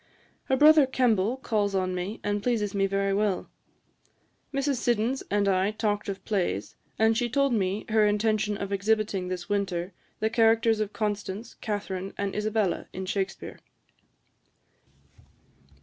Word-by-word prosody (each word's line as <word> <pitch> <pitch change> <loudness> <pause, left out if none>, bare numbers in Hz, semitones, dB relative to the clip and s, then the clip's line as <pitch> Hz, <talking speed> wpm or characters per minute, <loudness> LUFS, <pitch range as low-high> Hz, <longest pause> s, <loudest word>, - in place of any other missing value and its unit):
Her 265 - +1
brother 300 0 +7
Kemble 240 -3 +1
calls 210 -6 -1
on 185 -1 0
me, 180 +4 -4
and 205 0 -1
pleases 215 -3 0
me 195 -1 +2
very 195 0 0
well. 200 -2 0 1.0
Mrs. 275 -1 0
Siddons 240 +2 0
and 205 0 +1
I 190 0 +2
talked 210 -1 -2
of 195 - -6
plays; 175 - -1 0.2
and 220 0 +3
she 240 +1 0
told 275 +1 +2
me 195 -1 0
her 215 -1 +3
intention 210 0 +1
of 200 0 -4
exhibiting 200 -2 0
this 180 -1 -4
winter 195 -3 -2 0.3
the 220 0 0
characters 225 -1 +3
of 215 -1 -1
Constance, 210 0 -3
Catharine, 195 -3 -4
and 200 -1 -2
Isabella, 210 -2 0
in 190 0 -5
Shakspeare.' 195 0 -4
210 Hz, 140 wpm, -27 LUFS, 195-225 Hz, 1.0 s, brother